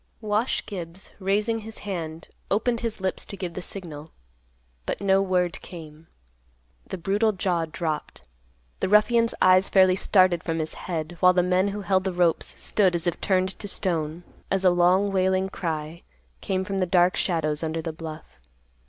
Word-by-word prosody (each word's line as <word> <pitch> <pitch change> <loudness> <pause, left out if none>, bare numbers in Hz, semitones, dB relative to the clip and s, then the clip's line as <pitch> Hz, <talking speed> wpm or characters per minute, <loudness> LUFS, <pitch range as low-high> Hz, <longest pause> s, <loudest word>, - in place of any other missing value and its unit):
Wash 215 +3 0
Gibbs, 180 -2 -7
raising 210 +4 0
his 220 0 -7
hand, 165 -4 -5 0.2
opened 230 +4 +1
his 225 -2 -3
lips 190 0 -2
to 200 - -7
give 180 -3 -5
the 185 - -5
signal. 165 -5 -7 0.8
But - - -2
no 195 -1 +3
word 180 -2 0
came. 160 -2 -11 0.8
The - - -5
brutal 205 +5 +1
jaw 180 -3 0
dropped. 155 - -4 0.6
The - - -1
ruffian's 230 +3 +4
eyes 185 +1 +5
fairly 185 -1 +5
started 185 -2 +3
from 165 -1 -2
his 155 -1 -3
head, 170 -1 -5
while 180 0 +6
the 180 -1 +3
men 180 +2 +2
who 205 +1 -3
held 190 -1 +1
the 190 - 0
ropes, 175 -2 0
stood 190 -4 +2
as 170 - -2
if 175 - -1
turned 185 -1 0
to 205 - -6
stone, 170 -3 -2 0.3
as 195 -1 0
a 180 - +7
long 180 +3 +3
wailing 190 0 +1
cry 160 -2 -4 0.4
came 190 -1 -1
from 195 0 -3
the 185 - +1
dark 175 0 +4
shadows 155 -4 0
under 160 0 -2
the 165 - -4
bluff. 155 - -9
185 Hz, 170 wpm, -25 LUFS, 165-195 Hz, 0.8 s, a